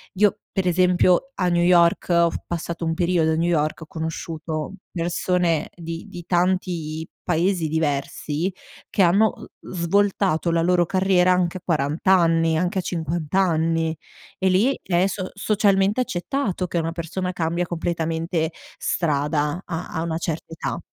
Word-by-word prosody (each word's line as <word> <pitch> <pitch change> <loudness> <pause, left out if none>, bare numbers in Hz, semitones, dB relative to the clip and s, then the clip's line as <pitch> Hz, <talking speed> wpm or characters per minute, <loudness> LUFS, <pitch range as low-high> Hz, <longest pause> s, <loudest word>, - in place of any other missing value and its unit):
io 205 +1 +3
per 190 -1 -1
esempio, 180 +7 +3
a 180 -2 0
New 175 0 +2
York 175 -1 +4
ho 170 -1 +4
f - - -4
passato 170 0 -4
un 165 0 0
periodo 170 -2 +2
a - - +1
New 170 +2 +1
York, 155 -1 0
ho - - -7
conosciuto 160 +1 -4 0.2
persone 170 -1 0
di 165 -1 -6
di 175 -1 -9
tanti 175 -3 0 0.2
paesi 175 -1 +1
diversi 155 +3 -1 0.4
che - - +1
hanno, 200 +5 +4 0.3
uhm, - - -10
svoltato 180 -1 +1
la 165 0 +2
loro 175 0 +3
carriera 185 0 +3
anche 180 0 +1
a 185 - -11
40 150 -1 -1
anni, 165 -3 +4
anche 180 +3 0
a - - 0
50 165 -3 -3
anni. 165 -3 +2 0.4
E 190 0 +2
lì 220 +9 +3
è 180 +1 +2
so 185 -1 -4
socialmente 200 +2 +2
accettato 195 -3 -2
che 175 - -3
una 165 0 -2
persona 180 +2 -3
cambia 170 0 -1
completamente 165 -1 -2 0.3
strada 150 +1 0
a 165 -1 -4
a 160 - -4
una 165 -1 -2
certa 165 -1 -4
età. - - -4
170 Hz, 155 wpm, -23 LUFS, 160-185 Hz, 0.4 s, York